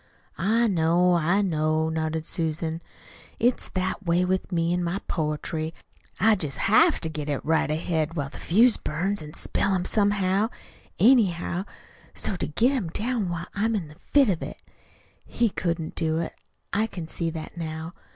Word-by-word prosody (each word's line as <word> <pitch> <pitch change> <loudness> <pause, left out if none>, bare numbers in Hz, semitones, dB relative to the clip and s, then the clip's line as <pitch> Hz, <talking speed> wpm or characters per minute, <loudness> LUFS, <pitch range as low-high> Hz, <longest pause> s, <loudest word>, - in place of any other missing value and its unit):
"I 220 +7 +3
know, 175 -1 +3
I 175 +4 +2
know," 155 -3 +1
nodded 160 0 -2
Susan. 160 0 -2 0.6
"It's 245 +1 +1
that 185 +2 -1
way 175 +1 +2
with 185 +1 -1
me 170 -1 +1
in 180 0 0
my 175 +2 -1
poetry. 155 +1 -2 0.4
I 220 0 +5
jest 155 -9 -2
HAVE 320 - +4
to 160 - 0
get 150 -3 -3
right 160 0 +2
ahead 160 0 -1
while 140 -3 -2
the - - -11
fuse 225 +7 +4
burns, 185 +6 -2
an' 150 +1 -9
spell 195 - +1
'em 180 -1 -1
somehow, 200 0 +2 0.5
anyhow, 195 -6 +3 0.5
so's 185 - -1
to - - -1
get 230 - +2
'em 250 -10 -1
down 220 +1 -1
while 170 0 -3
I'm 220 +2 0
in 175 -7 -3
the 150 - -14 0.2
fit 280 -3 +6
of 175 -5 0
it. - - -6 0.6
He 235 -1 0
couldn't 170 -4 -2
do 160 -1 0
it. 165 - -3 0.4
I 215 +2 +2
can 175 -6 -7
see 165 +1 -2
that 160 0 -7
now. 160 0 -5
175 Hz, 170 wpm, -26 LUFS, 160-200 Hz, 0.6 s, fit